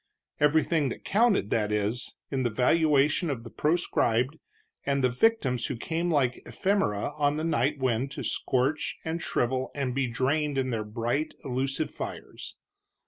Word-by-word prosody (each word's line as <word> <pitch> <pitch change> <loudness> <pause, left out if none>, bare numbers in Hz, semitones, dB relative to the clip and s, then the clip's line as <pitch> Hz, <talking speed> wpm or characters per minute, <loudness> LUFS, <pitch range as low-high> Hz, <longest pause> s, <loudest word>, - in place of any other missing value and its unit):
Everything 150 0 +3
that - - -7
counted, 210 - +2
that 105 -2 +1
is, 105 +3 -1 0.2
in 135 -2 0
the 120 - +1
valuation 150 +6 +3
of 125 -5 -3
the 115 - -10
proscribed, 150 -4 +1 0.4
and 140 -1 0
the 125 - +3
victims 130 - +2
who 135 - -3
came 165 +7 -2
like 135 -6 +1
ephemera 190 - 0
on 145 0 +2
the 155 - -2
night 150 -2 +1
wind 130 0 0
to - - -6
scorch 135 +4 0
and 165 +1 -2
shrivel 130 -2 0
and 135 -3 -1
be 135 0 0
drained 140 +5 0
in 130 -1 0
their 110 -2 -1
bright, 120 +8 -2
illusive 135 +3 -1
fires. - - -7
135 Hz, 155 wpm, -28 LUFS, 125-155 Hz, 0.4 s, Everything